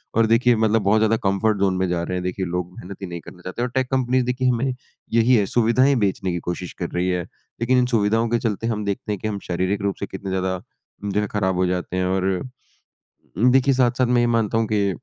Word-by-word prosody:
और 115 0 +4
देखिए 120 +2 +4
मतलब 110 0 +2
बहुत 100 +3 +3
ज़्यादा 110 +1 +3
कम्फ़र्ट 100 +2 +1
ज़ोन 95 -1 +2
में 95 0 +1
जा 90 -1 0
रहे 90 - -3
हैं, 90 - -3
देखिए 90 +1 -2
लोग 90 0 -3
मेहनत 95 +2 -9
ही 95 - -4
नहीं 85 -1 -6
करना 90 - -13
चाहते 95 +6 -6
हैं 125 - +1
और 125 - -11
टेक 130 -1 +1
कम्पनीज़ 130 -1 +1
देखिए 125 +1 0
हमें 125 +2 0 0.4
यही 115 +2 +5
है 105 - +3
सुविधाएँ 120 +6 +3
बेचने 95 -2 0
की 85 - -2
कोशिश 90 +1 -5
कर - - -2
रही 90 +1 -1
है, 90 -1 0 0.4
लेकिन 125 +2 +3
इन 125 - +4
सुविधाओं 110 +2 +2
के 120 0 +1
चलते 115 -1 -2
हम 105 -2 -2
देखते 100 +1 -3
हैं 100 - -2
कि - - -2
हम 105 -2 -3
शारीरिक 95 +3 -1
रूप 100 -1 -1
से - - -2
कितने 100 -1 -7
ज़्यादा 95 -1 -1 0.5
जो 105 - +2
है 105 - -2
खराब 95 -3 0
हो 90 - +2
जाते 90 0 -2
हैं। 90 - +1
और 95 +1 0 1.2
देखिए 135 +1 +4
साथ-साथ 125 0 +2
मैं 120 0 +3
ये 120 - +3
मानता 110 0 +1
हूँ 115 - +1
कि 100 -1 +2
105 Hz, 250 wpm, -22 LUFS, 95-120 Hz, 1.2 s, यही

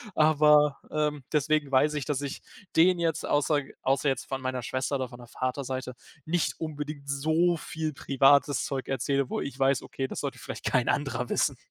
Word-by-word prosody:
aber, 150 -2 +5
ähm, 150 -2 -1
deswegen 150 -1 +1
weiß 145 +3 +4
ich, 145 - -2
dass 145 -2 -1
ich 140 -1 -5 0.3
denen 175 +2 +5
jetzt 165 -2 0
außer 145 0 +2 0.2
außer 135 +2 +1
jetzt 135 -3 -2
von 135 -1 -4
meiner 130 -1 -2
Schwester 130 +3 -2
oder 130 -2 -3
von 120 - -11
der 120 - -12
Vater 130 +3 -3
Seite 130 -1 -5 0.3
nicht 170 +1 -1
unbedingt 150 -2 -5
so 160 +5 +2
viel 160 0 -4
privates 140 +1 +3
Zeug 135 -1 -4
erzähle, 135 +1 0
wo - - -2
ich 140 -2 -5
weiß, 135 -1 +2
okay, 135 - -4
das - - -6
sollte - - -4
vielleicht - - -8
kein - - +2
anderer - - -1
wissen. - - +1
140 Hz, 190 wpm, -28 LUFS, 135-155 Hz, 0.3 s, aber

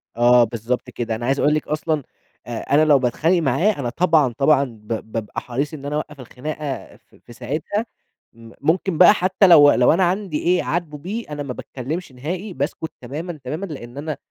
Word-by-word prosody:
آه، 120 0 +6
بالضبط 115 +2 -3
كده. 115 -2 -3
أنا 120 +2 -5
عايز 135 +2 +1
أقول 150 - +3
لِك 155 - -1
أصلًا 155 -1 -1 0.4
أ - - -8 0.2
أنا 155 +2 +5
لو 145 -3 +5
باتخانق 160 +8 +1
معاه 155 - +2
أنا 120 -3 -2
طبعًا، 155 -4 +2
طبعًا 140 0 +4
ب 110 -5 -10 0.2
بابقى 110 -2 -4
حريص 140 +6 -3
إن 140 -2 -8
أنا 145 +1 -3
أوقّف 150 -2 -5
الخناقة 140 +3 -6
في - - -26
في 120 - -15
ساعتها، 155 - -3 0.5
م 115 0 -14
ممكن 170 +3 +1
بقى 180 +4 +8
حتى 190 0 +3
لو 145 -5 +8
لو 125 +4 +4
أنا 185 +2 +2
عندي 180 -3 0
إيه 180 +1 +3
أعاتبه 160 -3 -3
بيه، 200 +10 -5
أنا 145 -1 -4
ما 130 -2 -5
باتكلّمش 135 +6 -6
نهائي، 175 +10 -5
باسكُت 145 +4 -3
تمامًا، 155 +6 -6
تمامًا، 155 +9 -4
لأن 135 -6 -9
أنا 155 +1 -4
150 Hz, 195 wpm, -21 LUFS, 125-170 Hz, 0.5 s, بقى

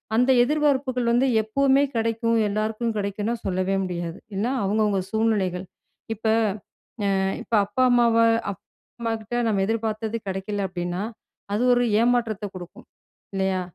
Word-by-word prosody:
அந்த 250 +3 +3
எதிர்பார்ப்புகள் 265 -4 +1
வந்து 245 +3 +3 0.2
எப்பவுமே 275 +5 +3
கிடைக்கும். 230 0 +1
எல்லாருக்கும் 215 +2 -1
கிடைக்கும்னா, 205 +3 -2
சொல்லவே 185 +1 0
முடியாது. 175 -1 -4 0.2
எல்லாம் 250 +5 0
அவங்கவங்க 205 -1 +1
சூழ்நிலைகள். 205 -5 0 0.5
இப்ப 220 - -4 0.8
அ - - +2 0.3
இப்ப 235 - -13
அப்பா, 255 +5 0
அம்மாவ 235 -1 +4 0.4
அம்மாகிட்ட 225 +3 -6
நம்ம 205 -3 +1
எதிர்பார்த்தது 220 0 -2
கிடைக்கல 195 +2 -3
அப்டின்னா, 175 +1 -4 0.5
அது 215 - +1
ஒரு 245 - +3 0.2
ஏமாற்றத்த 230 -4 +1
குடுக்கும் 175 -1 -10 0.5
இல்லையா? 190 -1 0
220 Hz, 120 wpm, -24 LUFS, 195-240 Hz, 0.8 s, அம்மாவ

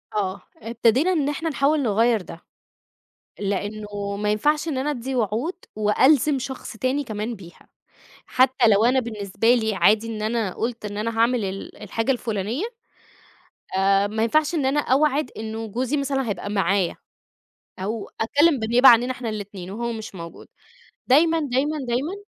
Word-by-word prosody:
آه، 195 -2 -2 0.2
ابتدينا 235 - +1
إن 300 -6 +1
إحنا 320 +3 -2
نحاول 290 +1 +1
نغيّر 225 0 +2
ده، 170 -1 -10 1.0
لأنّه 205 0 -3
ما 210 +1 -1
ينفعش 295 +9 +1
إن 280 -5 -2
أنا 275 +3 -1
أدّي 265 -1 -4
وعود 240 - -1 0.2
وألزم 260 +7 +3
شخص 260 -2 -7
تاني 260 +5 -1
كمان 220 0 -4
بيها، 175 -3 -15 0.6
حتّى 260 -1 +3
لو 215 +1 +4
أنا 255 +2 +4
بالنسبة 225 -1 0
لي 220 -3 0
عادي 210 +5 +3
إن 220 -2 -5
أنا 215 -3 -1
قُلت 235 -1 -4
إن 205 0 -5
أنا 225 +1 -3
هاعمل 235 0 +2
ال 195 +1 -6
الحاجة 225 +5 -1
الفلانية، 230 - -2 1.1
آآ، 195 +1 +3
ما 220 +2 -2
ينفعش 305 +8 +2
إن 290 -5 0
أنا 280 +3 +2
أوعد 285 0 +1
إنّه 220 +1 -5
جوزي 250 +6 -2
مثلًا 270 -3 -1
هيبقى 205 0 -4
معايا، 195 -2 +1 0.8
أو 205 +3 -4
أتكلّم 290 +6 +3
بالنيابة 240 +4 +5
عننا 240 +2 +6
إحنا 250 -2 -6
الاتنين 200 -4 -6
وهو 235 +4 -3
مش 220 -2 -7
موجود، 170 -2 -10 0.6
دايمًا، 325 +5 +4
دايمًا، 290 +1 0
دايمًا، 260 +9 -1
230 Hz, 155 wpm, -23 LUFS, 210-265 Hz, 1.1 s, عننا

